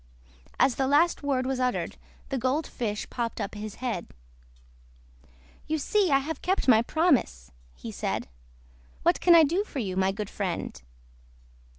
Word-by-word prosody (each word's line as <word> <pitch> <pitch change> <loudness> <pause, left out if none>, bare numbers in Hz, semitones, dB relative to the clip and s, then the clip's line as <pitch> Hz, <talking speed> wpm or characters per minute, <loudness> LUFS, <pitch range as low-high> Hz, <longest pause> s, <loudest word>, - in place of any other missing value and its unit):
As 255 - +3
the 265 - +1
last 305 +5 +3
word 270 -3 0
was 265 0 -1
uttered 250 -1 -1 0.3
the 270 - -1
Gold 260 +6 0
Fish 210 -3 -4
popped 235 -2 -3
up 200 -2 -3
his 210 0 -6
head. 235 -8 -3 1.6
"You 315 - 0
see 390 +6 +1
I 275 - +5
have 285 +2 -4
kept 375 -3 0
my 225 -3 +7
promise," 240 - +1 0.2
he - - -8
said. - - -3 0.8
"What - - +2
can 345 -1 +7
I 330 - +8
do 340 +7 +1
for 420 - -9
you, 195 -7 -2
my 190 0 +2
good 210 +1 -5
friend?" 175 - -4
255 Hz, 160 wpm, -27 LUFS, 210-305 Hz, 1.6 s, I